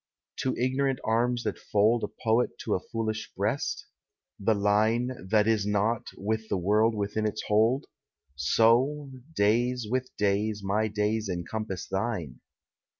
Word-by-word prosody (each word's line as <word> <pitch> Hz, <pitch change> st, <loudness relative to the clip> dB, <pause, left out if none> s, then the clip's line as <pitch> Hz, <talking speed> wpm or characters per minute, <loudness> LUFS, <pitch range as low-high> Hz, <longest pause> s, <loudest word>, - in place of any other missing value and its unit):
To 130 Hz, -, -1 dB
ignorant 130 Hz, +1 st, +1 dB
arms 120 Hz, +2 st, +1 dB
that -, -, -3 dB
fold 110 Hz, +3 st, +2 dB
A -, -, 0 dB, 0.2 s
poet 115 Hz, +2 st, +2 dB
to 105 Hz, -, -1 dB
a -, -, +1 dB
foolish 110 Hz, +2 st, -4 dB
breast? -, -, -1 dB, 0.5 s
The 110 Hz, +2 st, +2 dB
Line, 110 Hz, +5 st, +2 dB, 0.2 s
That 105 Hz, 0 st, +3 dB
is 110 Hz, -2 st, +2 dB
not, 105 Hz, +2 st, 0 dB
with 110 Hz, +2 st, -2 dB
the -, -, +1 dB
world 105 Hz, +5 st, +2 dB
within 105 Hz, +1 st, -1 dB
its 105 Hz, -, -4 dB
hold? 115 Hz, +7 st, +2 dB, 0.5 s
So, 120 Hz, -, +3 dB, 0.2 s
days 120 Hz, +3 st, +2 dB
with 130 Hz, +3 st, -1 dB
days, 105 Hz, +1 st, 0 dB
my 105 Hz, +3 st, +1 dB
days 105 Hz, 0 st, -1 dB
encompass 95 Hz, +2 st, -4 dB
thine. 95 Hz, -, -3 dB
110 Hz, 140 wpm, -28 LUFS, 105-120 Hz, 0.5 s, That